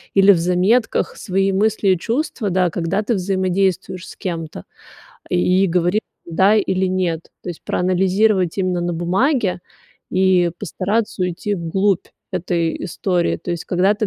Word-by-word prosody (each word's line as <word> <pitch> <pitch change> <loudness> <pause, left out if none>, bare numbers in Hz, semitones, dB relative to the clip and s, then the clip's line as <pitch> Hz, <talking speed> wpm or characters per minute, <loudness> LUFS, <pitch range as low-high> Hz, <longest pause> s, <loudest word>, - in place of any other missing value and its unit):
или 195 0 +7
в 180 - +3
заметках 180 +7 +1
свои 195 +1 0
мысли 205 +1 +1
и 185 -2 +3
чувства, 235 - -2
да, 180 -1 +1
когда 180 +5 -1
ты 235 - 0
взаимодействуешь 185 -1 -1
с - - -11
кем-то, 165 - -5 0.7
и 185 - +2
говорить 180 +4 +1 0.2
да 190 +5 +3
или 190 -2 +1
нет. 180 -3 -2
То - - -6
есть 170 - -10
проанализировать 185 +1 +1
именно 185 -2 0
на 175 0 -1
бумаге 185 - +1 0.5
и 185 -2 +3
постараться 205 +2 -2
уйти 180 +3 -2
в 170 -3 -5
глубь 195 +1 +1 0.3
этой 170 -2 -1
истории. 175 0 0
То 175 - -5
есть, 170 - -5
когда 190 +3 +2
ты 215 +1 -1
185 Hz, 150 wpm, -20 LUFS, 175-200 Hz, 0.7 s, или